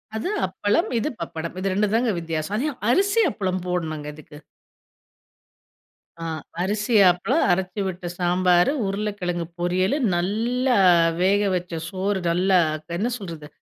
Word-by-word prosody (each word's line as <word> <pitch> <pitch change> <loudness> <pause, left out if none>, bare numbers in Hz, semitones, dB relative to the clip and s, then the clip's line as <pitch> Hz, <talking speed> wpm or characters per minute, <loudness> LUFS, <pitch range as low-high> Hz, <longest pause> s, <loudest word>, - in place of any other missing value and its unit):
அது 220 +11 -2 0.2
அப்பளம். 205 - 0
இது 300 - -1
பப்படம் 165 0 -5
இது 195 0 -1
2 210 +2 +2
ம் - - -3
தான் 240 +1 +2
வித்தியாசம். 165 +3 -3
அது 280 - 0 0.2
அரிசி 400 - +3
அப்பளம் 185 -4 -2
போடணும் 160 -4 -3
இதுக்கு. 150 0 -13 1.8
ஆ - - -6 0.4
அரிசி 210 +4 0 0.2
அப்பளம், 235 - 0
அரைச்சு 185 +2 -1
விட்ட 180 -1 -6
சாம்பார், 180 +3 +3 0.2
உருளைக்கிழங்கு 195 -4 -2
பொரியல், 185 +7 +1 0.2
நல்ல 225 +8 0 0.5
வேக 200 +2 +3
வச்ச 180 -1 -4 0.2
சோறு. 195 +1 -1
நல்லா 185 +2 +3 0.4
என்ன 230 +6 0
சொல்றது 165 -6 -8
185 Hz, 130 wpm, -23 LUFS, 175-210 Hz, 1.8 s, அரிசி